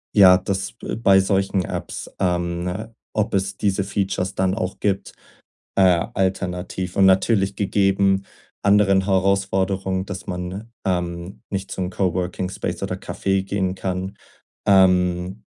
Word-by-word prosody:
Ja, 95 -3 +8
das 95 +1 -3 0.2
bei 100 -4 +5
solchen 95 -1 +1
Apps, - - -6
ähm, 90 +3 -1 0.2
ob 110 -1 0
es 95 0 0
diese 100 -1 0
Features 95 -1 -2
dann 95 0 +1
auch 95 -4 -3
gibt, 100 -1 -1 0.6
äh, - - +3 0.3
alternativ. 90 -1 -2
Und 95 - +5
natürlich 95 +1 +3
gegeben 95 -1 +2 0.4
anderen 100 -1 +4
Herausforderungen, 95 -1 +1
dass 100 -2 -7
man, 90 +5 -5
ähm, 90 0 -3
nicht 100 -1 -4
zum 90 -1 -2
Coworking 90 -1 -1
Space - - -4
oder - - -2
Café 95 -1 -1
gehen 95 -1 -1
kann, 95 0 -4 0.5
ähm, 90 -4 +3
95 Hz, 125 wpm, -22 LUFS, 90-100 Hz, 0.6 s, Ja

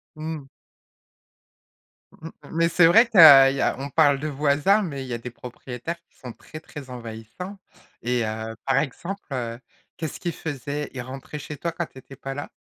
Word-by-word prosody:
Mmh. 155 -2 -5 1.7
Mmh, 160 +1 -10 0.2
mais 165 +1 +2
c'est 165 0 +5
vrai 225 +7 +7
tu 220 - -1
as 140 -5 +11
il 135 - -3
y - - 0
a - - +1
on 140 +1 -4
parle 145 -2 +4
de 155 - -3
voisins 150 +8 +2
mais 140 -7 -4
il - - -8
y 125 - -4
a - - -1
des 120 +1 -8
propriétaires 125 +6 -7
qui - - -36
sont 125 -3 -9
très, 155 - -11
très 145 -4 -10
envahissants 120 - -8 0.5
et 120 -1 +1
heu, 110 +1 -4
par 135 -1 +2
exemple, 170 +8 -3
heu, 120 -2 -3 0.4
qu'est-ce 160 -3 -5
qu'il 175 - -2
faisait? 145 -1 -5
Il 125 - -5
rentrait 135 +4 -8
chez 150 0 -7
toi 170 - -2
quand 165 0 -4
tu - - -19
étais 135 +1 -12
pas 135 0 -6
là? 145 - -6
140 Hz, 200 wpm, -24 LUFS, 125-160 Hz, 1.7 s, as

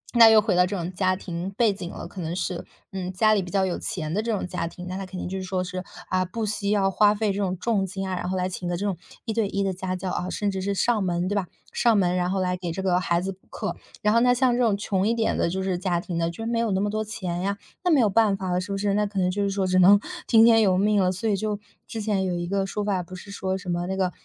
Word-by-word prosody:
那 230 -1 +9
又 220 -1 +7
回 210 -3 0
到 180 - +5
这 200 +2 -3
种 175 +1 -4
家 185 0 +1
庭 180 0 -5
背 225 -4 +4
景 180 -3 -6
了， - - -7
可 190 - -8
能 165 +1 -3
是， 180 -1 -3 0.3
嗯， 185 -1 -4
家 215 +4 +3
里 205 - +2
比 175 - -7
较 195 0 +2
有 180 - -2
钱 155 -4 -4
的 205 - +1
这 230 +1 -2
种 210 - -1
家 170 -1 -3
庭， 180 +1 -9
那 185 - -4
它 195 0 -4
肯 185 0 -7
定 - - -4
就 190 +1 -3
是 - - -5
说 185 0 -1
是， 185 0 -5 0.3
啊， 185 0 +2
不 215 +5 -3
惜 205 -1 -2
要 200 -2 +2
花 205 +2 +4
费 210 -1 0
这 - - -4
种 185 -2 -1
重 210 +1 +1
金 195 +1 -4
啊， 185 - -2
然 180 - -3
后 190 - -1
来 180 0 0
请 180 -1 -5
一 - - -1
个 175 - -1
这 200 - -3
种 200 -3 0 0.3
一 225 - -2
对 220 -2 +1
一 200 0 -1
的 195 -1 0
家 185 0 -3
教， 185 0 -4
啊， 180 +1 -2
甚 205 +1 -1
至 190 -1 -3
是 200 +1 -1
上 220 +1 +2
门， 175 -1 0
对 205 - -1
吧， 195 -3 0 0.2
上 235 -3 +3
门 180 -2 +2
然 180 0 0
后 190 +1 0
来 180 0 0
给 175 -2 -4
这 190 +3 -4
个 180 -1 +3
孩 170 -2 +1
子 190 +2 -2
补 190 0 -16
课。 - - -4 0.3
然 210 - +4
后 230 - +5
那 245 +1 +4
像 250 0 +3
这 250 - +1
种 215 -4 +2
穷 200 -1 0
一 230 - +2
点 225 -1 +1
的 - - +1
就 190 +2 -2
是 185 -2 -1
家 180 -2 0
庭 170 -1 -4
的 165 0 +1
就 200 +7 -6
没 230 0 0
有 230 -1 +1
那 190 - +1
么 205 +1 0
多 215 0 -1
钱 185 -5 -4
呀， 200 +2 -1 0.3
那 360 - +2
没 300 - +5
有 230 - +5
办 205 -1 +3
法 190 -1 -3
了， 180 +1 +1
是 185 - -6
不 195 - -1
是？ 200 0 0
那 210 +1 +1
可 200 0 -8
能 180 0 +2
就 205 +2 -2
是 200 - +1
说 195 -1 0
只 185 0 +3
能 195 +3 +7 0.3
听 225 -1 +7
天 225 -1 +6
由 190 -4 +3
命 205 +1 +3
了， 185 -1 +2
所 195 +5 -3
以 205 - +2
就 210 +1 -2 0.3
之 225 - -5
前 205 -2 0
有 180 -1 -1
一 175 0 -2
个 195 +1 0
说 205 +1 -3
法， 195 -3 0
不 180 +1 -9
是 200 +3 -10
说 190 -1 -2
什 190 -1 -11
么 175 0 -1
那 190 0 -2
个 185 -2 +1
190 Hz, 350 characters per minute, -25 LUFS, 180-210 Hz, 0.3 s, 那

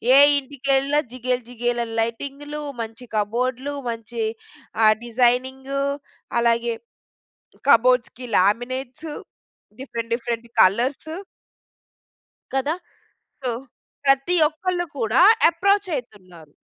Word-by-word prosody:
ఏ - - +8 0.2
ఇంటికెళ్ళినా 275 +1 +1
జిగేల్, 250 0 -2
జిగేల్ 240 0 -1
అని 225 -1 -7
లైటింగ్‌లు, 280 +6 -4 0.2
మంచి 225 +2 -7
కబోడ్లు, 250 +6 -1 0.2
మంచి 230 0 -5 0.6
ఆహ్, 215 0 +7
డిజైనింగు, 260 +3 +1 0.6
అలాగే 235 0 +2 1.0
కబోర్డ్స్‌కి 250 0 +4
లామినేట్స్, 255 - 0 0.7
డిఫరెంట్, 230 -3 -5
డిఫరెంట్ 235 -1 -3 0.2
కలర్స్ 245 +10 +2 1.5
కదా! 285 +5 +1 0.7
సో 255 - -1 0.6
ప్రతి 275 +6 +3
ఒక్కళ్ళు 350 +3 -2
కూడా 230 +3 +2 0.3
అప్రోచ్ 395 +3 +1
అయితున్నారు. 185 - -9
250 Hz, 85 wpm, -23 LUFS, 230-275 Hz, 1.5 s, ఏ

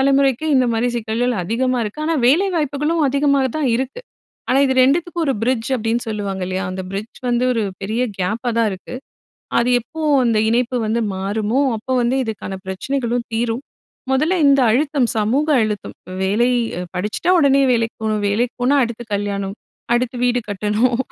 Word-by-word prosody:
தலைமுறைக்கு 275 +1 +2
இந்த 255 -1 +3
மாதிரி 235 +2 +1
சிக்கல்கள் 235 +2 -1
அதிகமா 250 +5 0
இருக்கு. 210 +8 -6
ஆனா 330 - +1
வேலை 330 +10 +4
வாய்ப்புகளும் 300 +2 0
அதிகமா 280 +1 +2 0.2
தான் 280 -4 +1
இருக்கு. 265 - -4 0.5
ஆனா 265 +2 +4
இது 265 - +1
2த்துக்கும் 335 +5 +1
ஒரு 275 - +2
பிரிட்ஜ் 240 -1 0
அப்படின்னு 230 0 -1
சொல்லுவாங்க 200 -3 -3
இல்லையா. 185 +1 -2
அந்த 190 0 -4
பிரிட்ஜ் 205 +4 -6
வந்து 240 +1 +1
ஒரு 225 - 0 0.2
பெரிய 220 +5 -2 0.2
கேப்பா 215 +7 -1
தான் 225 - +3
இருக்கு. 190 +6 -8 0.6
அது 240 +1 +1
எப்போ 320 +7 -9 0.2
அந்த 230 -2 +2
இணைப்பு 245 +2 +1
வந்து 225 +2 0
மாறுமோ, 210 +6 -1 0.2
அப்போ 230 +4 -7
வந்து 240 +2 +1
இதுக்கான 215 -4 -5
பிரச்சனைகளும் 240 +5 -2
தீரும். 230 +3 -1 0.5
மொதல்ல 310 +8 +2
இந்த 275 0 +5
அழுத்தம், 275 -1 +1
சமூக 250 +9 +1
அழுத்தம். 210 -2 -3 0.3
வேலை 220 +6 +2 0.5
படிச்சுட்டா, 210 - -1
உடனே 275 -2 +4
வேலைக்கு 230 -1 -1
போணும். 215 -1 0
வேலைக்கு 230 +5 0
போனா, 270 +3 +3
அடுத்து 235 0 -4
கல்யாணம். 200 -1 -2 0.4
அடுத்து 250 +1 -1
வீடு 245 0 +1
கட்டணும். 210 +5 +1
240 Hz, 160 wpm, -19 LUFS, 215-270 Hz, 0.6 s, இந்த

